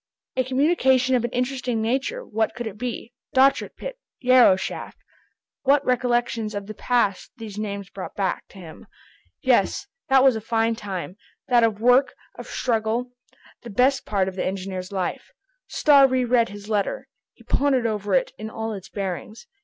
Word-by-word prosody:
A 255 - +2
communication 260 -1 +2
of 245 -2 +2
an 240 - -1
interesting 250 -1 -2
nature, 265 - -1
what 220 0 -1
could 240 -1 -5
it 210 -1 -7
be? 245 -1 -5 0.2
Dochart 270 +1 +3
pit. - - -7 0.2
Yarrow 250 -6 +6
shaft! 190 - -6 0.6
What 280 +1 +3
recollections 240 -3 0
of 205 -1 -4
the 215 - -7
past 215 -4 0
these 215 -3 -7
names 200 -2 -5
brought 190 - -7
back 195 -2 -2
to - - -17
him! 165 -4 -12 0.6
Yes, - - +2 0.2
that 265 -1 +6
was 265 -3 +5
a 220 - -4
fine 225 +1 +1
time, 195 -3 -6 0.3
that 240 -2 +5
of 220 -2 +1
work, 250 +4 +4 0.2
of - - -10
struggle,—the 240 +1 -4
best 255 +6 +2
part 195 -3 0
of 190 - -5
the - - -2
engineer's 185 -1 -4
life. 190 -3 -3 0.4
Starr 280 -3 +5
re 255 -1 +1
read 235 -1 +3
his 205 +1 -10
letter. 215 - -1 0.3
He - - -20
pondered 270 -4 +1
over 210 -2 0
it - - +1
in 215 +1 -5
all 220 0 -4
its 195 -3 -9
bearings. 200 +2 -5
230 Hz, 170 wpm, -24 LUFS, 205-255 Hz, 0.6 s, Yarrow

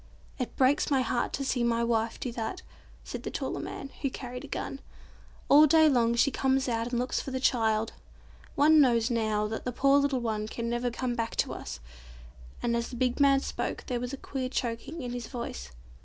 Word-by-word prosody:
"It 250 - -3
breaks 270 +2 +3
my 270 -3 +3
heart 240 0 -1
to 275 - -2
see 250 -2 0
my 235 0 +1
wife 230 -1 0
do 250 - -3
that," 230 +10 -4 0.4
said - - -6
the - - -4
taller - - -3
man, 275 - -6
who 275 - +1
carried 250 -1 -7
a - - -8
gun. 275 - -5 0.7
"All 300 +2 +8
day 315 +1 +6
long 235 -5 +3
she 275 +4 +3
comes 265 0 +1
out 230 -1 -1
and 245 0 -2
looks 250 +1 -1
for - - -6
the 260 0 -2
child. 225 -4 +1 0.6
One 305 +1 +6
knows, 235 -3 +3
now, 215 -2 +1
that 220 +1 -4
the 250 - -2
poor 275 +3 +4
little 280 -2 +1
one 215 -3 -2
can 235 +1 -4
never 240 +1 0
come 245 +1 -2
back 230 -1 -3
to - - 0
us," - - -7 0.8
and 235 -1 +1
as 235 0 -2
the 250 - -7
big 250 +2 0
man 275 -1 +5
spoke - - -3
there 245 -2 -2
was 245 +1 -4
a 275 - -5
queer 260 -1 -4
choking 255 +5 -3
in 245 - -4
his 245 -2 -5
voice. 70 - -6
245 Hz, 215 wpm, -29 LUFS, 230-270 Hz, 0.8 s, All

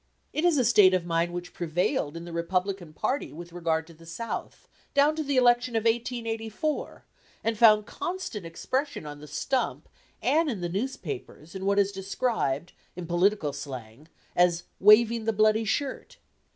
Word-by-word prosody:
It 305 - -1
is 345 -4 +4
a 255 - +3
state 205 -5 +6
of 180 -2 -1
mind 170 0 0
which 175 0 -6
prevailed 170 - -1
in 170 - -7
the 170 - -8
Republican 180 0 -2
party 235 - -2
with 170 +2 -10
regard 165 -2 -1
to 165 - -15
the 165 +1 -17
South, 200 +8 -6 0.3
down 290 +2 +4
to 315 - -2
the 280 -3 -1
election 245 -1 +4
of 225 - +1
1884, 230 +3 -2 0.4
and 225 0 0
found 215 -1 +6
constant 345 - -5
expression 260 - -3
on 145 0 -8
the 150 - -11
stump 250 - -2 0.3
and 320 +1 +2
in 215 -8 -3
the 175 - -2
newspapers 170 - -5
in 190 0 -4
what 200 0 +2
is 200 0 +3
described, 190 - -2 0.2
in 180 - -6
political 175 -2 +1
slang, 135 -1 -8 0.3
as 175 -1 +3 0.2
"waving 220 +2 +6
the 225 - +1
bloody 215 +1 +3
shirt." 270 +5 -3
200 Hz, 165 wpm, -27 LUFS, 170-235 Hz, 0.4 s, state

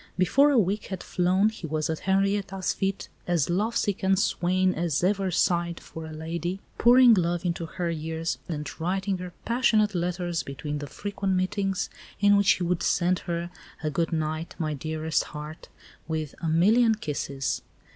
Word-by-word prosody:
Before 265 +11 +4
a 280 - +3
week 205 0 +1
had 190 -2 -5
flown 185 +4 +2
he 220 -6 -7
was 155 0 -1
at 160 -1 -2
Henrietta's 195 -1 +1
feet, 195 0 -2 0.2
as 175 -3 +1
lovesick 205 +1 0
a 190 0 +3
swain 185 0 +2
as 170 -1 -1
ever 195 0 +2
sighed 170 -1 +1
for 160 -1 -9
a - - -8
lady, 170 +4 -4 0.2
pouring 245 0 +7
love 175 -2 +1
into 170 -1 -2
her 175 0 -3
ears 160 +1 -3
and 150 -3 -3
writing 190 +2 -1
her 180 0 -6
passionate 225 -4 +3
letters 175 -1 -1
between 145 +2 -5
the 145 - -6
frequent 200 +2 -2
meetings, 195 +1 0 0.3
in 205 0 +5
which 200 -1 +5
he 180 - -3
would 175 0 0
send 180 +1 +2
her 170 0 -4 0.3
a 155 - 0
"good 165 +4 0
night, 155 0 -2
my 155 -2 -1
dearest 155 +2 -1
heart," 150 +1 -9 0.4
with 155 -3 -3
"a 165 - -2
million 220 +8 +4
kisses." 140 -8 -3
175 Hz, 165 wpm, -26 LUFS, 160-195 Hz, 0.4 s, pouring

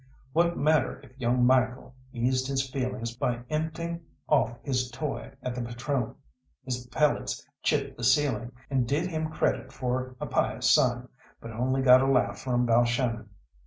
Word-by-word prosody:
What 170 +1 +2
matter 155 +1 +2
if - - -15
young 125 0 +2
Michael 130 0 +2 0.2
eased 130 +1 0
his 135 -1 0
feelings 125 -3 -3
by 120 0 -1
empting 165 +2 -2 0.3
off 120 -6 +2
his 125 -1 -1
toy 150 +2 -5
at 125 - -2
the 125 - -4
patrone? 120 +1 -2 0.5
His 125 -1 -4
pellets 150 +3 0
chipped - - 0
the - - -6
ceiling, 130 -2 +2 0.2
and 130 -3 +1
did 160 +8 0
him 155 -1 -2
credit 130 -4 -1
for 130 -1 -3
a - - -3
pious - - +1
son, - - +3 0.3
but 115 - -8
only 130 +4 0
got 130 0 +8
a 135 - +2
laugh 125 -7 +2
from 125 -1 0
Balshannon. 120 -1 +1
130 Hz, 160 wpm, -28 LUFS, 120-140 Hz, 0.5 s, got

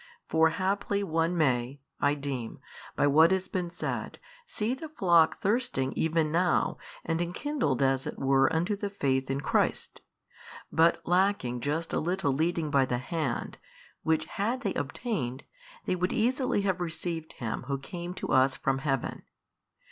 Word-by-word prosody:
For 160 0 +4
haply 200 +3 -1
one 165 0 0
may 130 -3 +1 0.2
(I 145 +1 +2
deem) 135 -5 -5 0.4
by - - +2
what 155 +3 +6
has 190 0 0
been 180 -2 -2
said 175 - -4 0.3
see 220 +2 -1
the 305 +4 -7
flock 170 - +4
thirsting 205 - 0
even 160 -1 +1
now 175 +2 +1 0.3
and 165 +1 0
enkindled 175 - -1
as 135 0 +1
it - - -5
were 135 0 +3
unto 175 +6 +1
the 200 0 -3
faith 135 -9 0
in 135 +1 -1
Christ, - - 0 0.7
but 165 +1 +3
lacking 180 -9 +2
just 150 +6 -2
a - - +2
little 175 -4 0
leading 160 +1 0
by 140 -2 +4
the 125 -1 -1
hand, 130 0 -3 0.4
which 160 -1 +1
had 230 +9 -2
they 200 - -1
obtained, 140 - -3 0.4
they - - +1
would 180 +1 -1
easily 250 -1 +1
have 190 -2 0
received 165 -1 -4
Him 115 0 -4
Who 140 -1 -1
came 175 +6 -7
to - - -5
us 130 +1 +4
from 135 0 0
Heaven. 135 -3 -2
160 Hz, 155 wpm, -29 LUFS, 135-185 Hz, 0.7 s, what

